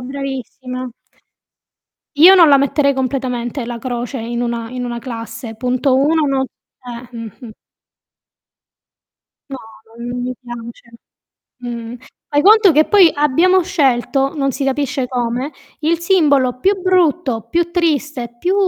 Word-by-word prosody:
bravissima. 255 -1 -6 1.2
Io 350 +6 +8
non 340 -5 +6
la 280 - +6
metterei 280 +1 +2
completamente 255 -1 -3
la 240 0 -6
croce 245 +2 -4
in 235 +1 -4
una 235 -1 -3
in 250 +1 -5
una 240 -1 -4
classe, 230 -1 -7
punto 255 +2 0
1 300 +3 +2
no 270 -1 0
s 250 0 -19 0.2
eh, 240 - -11
mh-mh. 230 +1 -9 2.0
No, 270 - -5 0.4
non 245 +1 -5
mi 255 +1 -3
piace. 235 -1 -10 0.7
Mh. 240 -1 -6 0.3
Fai 290 0 +1
conto 415 -1 +6
che 310 +1 +4
poi 390 -5 +6
abbiamo 330 +6 +3
scelto, 275 -4 0
non 275 -2 -1
si 275 - -3
capisce 275 -1 -1
come, 250 +3 -3 0.3
il 320 +2 +1
simbolo 285 -9 +2
più 390 +3 +1
brutto, 340 - +1
più 345 0 0
triste, 300 -8 -1
più 360 +8 0
265 Hz, 130 wpm, -17 LUFS, 240-300 Hz, 2.0 s, Io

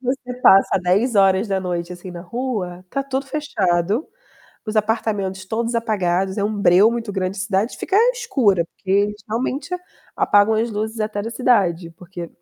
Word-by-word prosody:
Você 250 -1 -3
passa 195 -3 +5
22:00, 190 -3 +1
assim, 180 +1 -9
na 175 -1 -8
rua, 190 -4 -4
tá 275 - -1
tudo 270 0 -3
fechado, 215 - 0 0.6
os 215 0 -3
apartamentos 205 -3 -1
todos 230 +3 -2
apagados, 190 -4 0
é 200 - 0
um 215 +1 -1
breu 195 +5 +5
muito 235 -3 -3
grande, 190 0 -2
a - - -3
cidade 195 +4 -1
fica 390 - 0 0.2
escura, 260 - +1
porque 190 - -8
eles 205 +1 +2
realmente 255 +8 -3 0.4
apagam 205 +2 +3
as 225 +2 0
luzes 220 +2 -4
até 215 -1 -2
da 225 - -5
cidade, 190 -10 +1
porque 175 -1 -8
205 Hz, 155 wpm, -21 LUFS, 185-235 Hz, 0.6 s, passa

